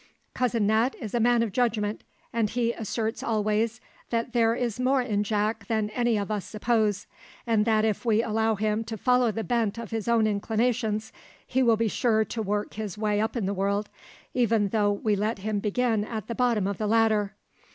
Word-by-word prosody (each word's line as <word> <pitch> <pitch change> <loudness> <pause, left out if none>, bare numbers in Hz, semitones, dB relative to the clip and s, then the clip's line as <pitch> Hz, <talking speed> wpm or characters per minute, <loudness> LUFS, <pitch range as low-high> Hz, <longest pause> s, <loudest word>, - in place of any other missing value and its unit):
Cousin 235 -4 +1
Nat 220 +5 +2
is 220 -5 -6
a 240 - +1
man 235 0 +4
of 225 - -2
judgment, 215 -2 0 0.3
and 230 -2 +1
he 235 0 0
asserts 225 0 -3
always 215 +1 0 0.3
that 235 +1 -2
there 230 -1 +3
is 240 -1 -2
more 255 +1 +2
in 210 -4 0
Jack 210 0 -1
than 215 -2 0
any 240 -1 +1
of 205 +1 -3
us 210 -3 -1
suppose; 215 -2 0 0.4
and 225 -3 +2
that 220 -1 +3
if 215 0 -1
we 225 -1 +2
allow 220 0 +1
him 215 +2 0
to 225 0 -5
follow 250 0 +3
the 225 +2 -3
bent 230 -3 0
of 230 -3 -7
his 225 -1 -3
own 230 -2 +3
inclinations, 220 +1 0 0.3
he 260 - 0
will 230 -3 +4
be 230 +1 +1
sure 220 0 +2
to 225 +2 -4
work 210 0 -2
his 210 -2 -5
way 210 -1 +1
up 220 +3 -1
in 230 -5 -1
the 195 - -1
world, 200 +2 -1 0.4
even 225 -4 +2
though 205 -1 +2
we 205 +1 0
let 215 +3 -1
him 205 +1 -2
begin 220 +1 0
at 215 -1 -5
the 235 - -4
bottom 235 -5 +1
of 200 -1 -2
the 215 - -1
ladder. 215 -2 +2
220 Hz, 205 wpm, -26 LUFS, 210-235 Hz, 0.4 s, man